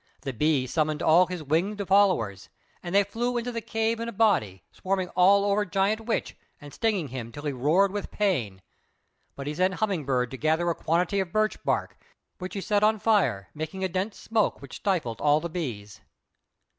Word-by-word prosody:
The 135 -2 -4
Bee 140 +2 +1
summoned 155 +3 -1
all 175 +3 +5
his 180 -3 -5
winged 190 +7 -1
followers, 185 - +2 0.3
and 175 +2 -4
they 200 - +6
flew 240 +5 -2
into 240 +1 -2
the 230 -1 -4
cave 225 +1 -1
in 230 0 -3
a - - -5
body, 185 - +1
swarming 190 -1 -2
all 200 +2 +4
over 205 +1 +2
Giant 200 +3 0
Witch 230 - -2 0.2
and 145 -1 -12
stinging 200 -10 0
him 120 -3 -6
till 145 +4 -9
he 145 - -1
roared 155 +10 +2
with 205 0 -4
pain; 120 - -1 0.7
but 140 - -7
he 145 - -3
sent 185 +3 +1
Humming 195 -7 -1
bird 125 -2 0
to 130 - -6
gather 160 +4 +1
a - - 0
quantity 175 +5 0
of 190 -3 -2
birch 215 +2 0
bark, - - -2 0.4
which 185 +1 -6
he 195 - -3
set 205 +1 +1
on 215 +1 +4
fire, 200 - +1
making 160 +5 -5
a - - +2
dense 190 +4 -3
smoke 225 -2 0
which 140 - -9
stifled 165 - -1
all 150 +1 +4
the 170 +1 -6
bees. 115 - -5
180 Hz, 195 wpm, -26 LUFS, 145-205 Hz, 0.7 s, they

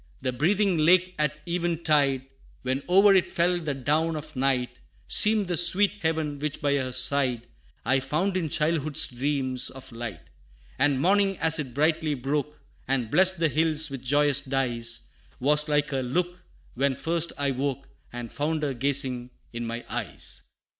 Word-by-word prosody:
The 130 -1 -2
breathing 185 - +1
lake 180 +3 +4
at 150 0 0
even 170 -1 -2
tide, 140 -4 +2 0.4
When 130 +2 -1
o'er 195 +2 +6
it 190 -2 +2
fell 175 +1 +1
the 150 -4 -3
down 155 +5 0
of 155 0 -8
night, 125 -2 -1 0.3
Seemed 210 -2 +4
the 175 - -1
sweet 180 +4 +3
heaven, 160 -3 -1
which 150 0 -3
by 145 -1 +1
her 130 -2 -3
side, 125 -3 +1 0.4
I 135 +1 +3
found 155 +9 -1
in 170 -4 -1
childhood's 155 0 +1
dreams 130 0 -2
of 130 0 -11
light: 115 -8 -7 0.6
And 135 -1 +2
morning, 195 +3 +2
as 160 0 +2
it 130 -5 -5
brightly 155 0 +1
broke, 145 +3 -3 0.3
And 125 -4 -1
blessed 190 0 +4
the 165 -1 +2
hills 155 0 +1
with 135 -2 -6
joyous 145 +1 +3
dyes, 120 -4 0 0.3
Was 150 +3 +3
like 145 0 +1
her 135 -1 -1
look, 175 +8 -2 0.3
when 135 +1 0
first 165 +4 -1
I 140 -2 0
woke, 135 +1 -3 0.2
And 120 -1 -7
found 155 +1 -2
her 140 -2 -1
gazing 130 -1 0 0.2
in 120 0 -4
my 115 +1 -5
eyes. - - -5
145 Hz, 165 wpm, -26 LUFS, 130-165 Hz, 0.6 s, o'er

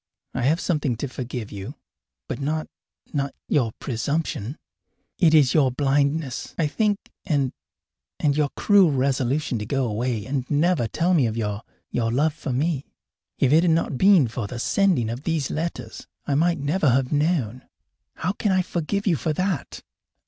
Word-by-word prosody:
I 125 - -2
have 150 +7 +2
something 150 -10 0
to 130 +5 -4
forgive 125 -3 -6
you, 100 -2 -7 0.5
but - - -4
not 155 +3 -1 0.5
not 140 -2 -2
your 120 -6 +1
presumption. 140 - -2 0.6
It 160 -4 +5
is 145 -5 +5
your 140 -4 +4
blindness, 140 +1 0
I 165 - +2
think 205 +7 +1 0.3
and 140 -7 0 0.7
and 145 -2 +2
your 150 -1 +2
cruel 200 -6 +5
resolution 135 -1 0
to 105 - -4
go 135 +1 0
away 115 -1 -2
and 130 +1 -3
never 150 -4 +2
tell 170 +10 +1
me 145 -9 +4
of 110 0 -3
your 105 -2 -2 0.3
your 115 -1 0
love 145 +5 +2
for 140 - -5
me. 140 +2 -1 0.5
If 135 +1 +3
it 160 - +6
had 175 - +3
not 160 -5 0
been 190 -9 +6
for 115 -1 -4
the 125 - -6
sending 175 - +2
of 120 +3 -4
these 155 -3 -1
letters 150 -8 -4 0.2
I 145 - -1
might 170 +4 +2
never 150 +2 +1
have 130 +1 +2
known. 145 -6 0 0.5
How 180 - -1
can 205 0 -1
I 185 -1 +3
forgive 180 +4 -2
you 185 -5 +3
for 155 +3 -1
that?" 185 -3 -2
140 Hz, 170 wpm, -24 LUFS, 125-165 Hz, 0.7 s, it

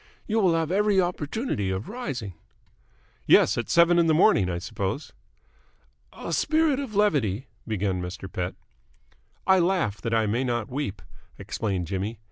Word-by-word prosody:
"You 225 +1 0
will 185 -5 +3
have 165 0 -1
every 205 0 +3
opportunity 175 - -1
of 95 +3 -3
rising." 140 - -5 0.9
"Yes. 95 - +6
At 120 - -3
seven 170 0 +5
in 170 - +3
the 160 - +4
morning, 105 - +4
I 85 - -2
suppose?" 100 - -4 1.0
"A - - -6
spirit 315 -3 +2
of 260 -7 -5
levity 135 - +1
" - - -35
began 100 -4 -1
Mr. 90 +2 -6
Pett. 90 -1 -4 0.9
"I 190 -1 +5
laugh 170 - 0
that 115 -1 -1
I 110 -1 +2
may 115 +5 0
not 120 -2 -2
weep," 130 -8 -4 0.3
explained 95 -5 -3
Jimmy. 100 +5 -3
125 Hz, 155 wpm, -26 LUFS, -, 1.0 s, Yes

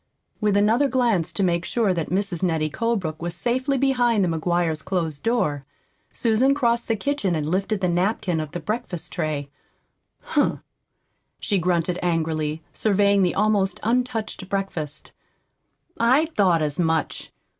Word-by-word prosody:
With 210 -2 +2
another 225 +7 +3
glance 235 - +1
to 200 - -1
make 170 -2 +1
sure 215 -1 +1
that 165 -3 -3
Mrs. 190 -2 -1
Nettie 160 -4 0
Colebrook 190 -9 -2
was 170 0 -3
safely 260 +3 0
behind 245 -5 +2
the - - +2
McGuires' 165 -2 0
closed 165 -6 -2
door, 215 - 0 0.5
Susan 245 +4 +2
crossed 235 -4 +1
the 225 - +1
kitchen 210 -5 -1
and 150 -2 -2
lifted 195 +4 -1
the 180 - +2
napkin 180 0 0
of 155 -2 -4
the 175 - -5
breakfast 210 -6 -4
tray. 150 -4 -3 0.7
"Humph!" - - 0 0.8
she 200 - 0
grunted 175 0 0
angrily, 160 -2 -1
surveying 200 -1 +3
the 180 -2 +1
almost 200 -2 +1
untouched 230 -4 -1
breakfast. 185 -7 -3 0.9
"I 255 +7 +4
thought 180 -6 +3
as 150 +1 -2
much! 160 -2 -1
190 Hz, 145 wpm, -23 LUFS, 165-225 Hz, 0.9 s, I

